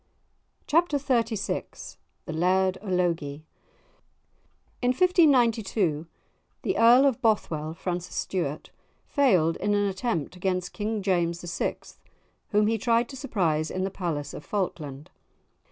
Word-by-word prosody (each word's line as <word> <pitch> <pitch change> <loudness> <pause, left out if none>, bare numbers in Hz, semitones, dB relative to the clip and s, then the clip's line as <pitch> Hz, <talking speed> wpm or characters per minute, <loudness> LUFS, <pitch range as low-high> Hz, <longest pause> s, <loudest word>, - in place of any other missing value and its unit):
*Chapter 325 -1 +2
XXXVI* 230 -6 -2 0.3
*The - - -5
Laird 185 +3 +2
o' 210 - -10
Logie* 165 -5 -1 1.4
In 245 - +1
1592, 235 - +3 0.6
the - - 0
Earl 240 +4 +7
of 265 -2 +1
Bothwell, 160 - 0
Francis 175 +1 -4
Stuart, 160 -6 -3 0.3
failed 185 - +2
in 205 0 0
an 205 0 +2
attempt 190 - -2
against 180 -1 -2
King 215 0 -3
James 175 -3 0
VI., - - -1 0.7
whom 210 0 +3
he 225 +1 +1
tried 235 +1 +2
to 270 - -8
surprise 175 - 0
in 185 - -2
the 190 - -2
palace 165 -7 -4
of - - -8
Falkland. 155 -8 -4
190 Hz, 120 wpm, -26 LUFS, 170-230 Hz, 1.4 s, Earl